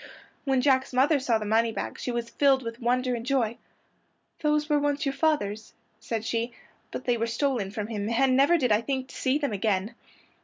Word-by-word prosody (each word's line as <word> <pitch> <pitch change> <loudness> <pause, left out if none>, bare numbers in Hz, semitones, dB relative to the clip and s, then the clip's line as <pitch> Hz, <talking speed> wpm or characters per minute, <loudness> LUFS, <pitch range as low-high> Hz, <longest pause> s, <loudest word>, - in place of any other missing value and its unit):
When 265 -2 +2
Jack's 260 -1 +2
mother 280 +4 +3
saw 245 -4 +1
the 215 - -5
moneybags 225 +1 0
she - - -3
was 235 -1 -3
filled 270 -2 +3
with 230 0 -6
wonder 250 +1 +1
and 235 -1 -3
joy. 240 -3 0 0.8
"Those 300 0 +1
were 295 -1 +2
once 290 0 0
your 275 - 0
father's," 220 -9 -1 0.3
said 225 -1 -4
she, 230 +1 -2 0.4
"but - - -6
they 245 -1 +2
were 230 +1 -1
stolen 230 -4 -1
from 210 0 -4
him, 210 -1 -3
and 255 +2 +3
never 280 +6 +5
did 250 -7 +1
I 210 +1 +4
think 260 +1 -3
to - - -12
see 265 +1 +1
them 285 -7 -2
again." 200 +1 0
250 Hz, 200 wpm, -27 LUFS, 225-275 Hz, 0.8 s, never